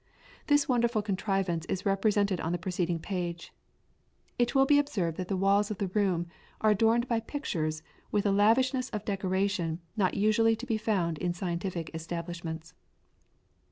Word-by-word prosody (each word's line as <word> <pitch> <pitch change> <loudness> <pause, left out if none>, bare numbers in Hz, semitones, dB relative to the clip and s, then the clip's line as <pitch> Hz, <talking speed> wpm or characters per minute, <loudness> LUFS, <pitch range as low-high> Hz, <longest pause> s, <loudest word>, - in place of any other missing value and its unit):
This 290 -1 +4
wonderful 235 -4 +2
contrivance 195 -4 -1
is 185 - -3
represented 200 -1 +2
on 165 - -2
the 175 - 0
preceding 175 -1 -1
page. 175 -1 -4 0.9
It 240 +2 +1
will 270 0 +6
be 290 +1 +5
observed 190 - -1
that 185 - -3
the 195 - -1
walls 200 +2 +3
of 215 - -4
the 195 -1 -2
room 185 -4 +1 0.3
are 215 - +4
adorned 225 +3 +3
by 230 -2 +1
pictures 160 - -3 0.3
with 205 -1 +1
a 200 - +3
lavishness 255 +6 +3
of 210 -1 -5
decoration 190 -4 -1 0.2
not 190 -4 +1
usually 215 +2 +3
to 230 +3 -7
be 225 -4 -1
found 180 -8 0
in 175 -1 -1
scientific 175 -2 -3
establishments. 165 0 -5
195 Hz, 160 wpm, -29 LUFS, 175-220 Hz, 0.9 s, will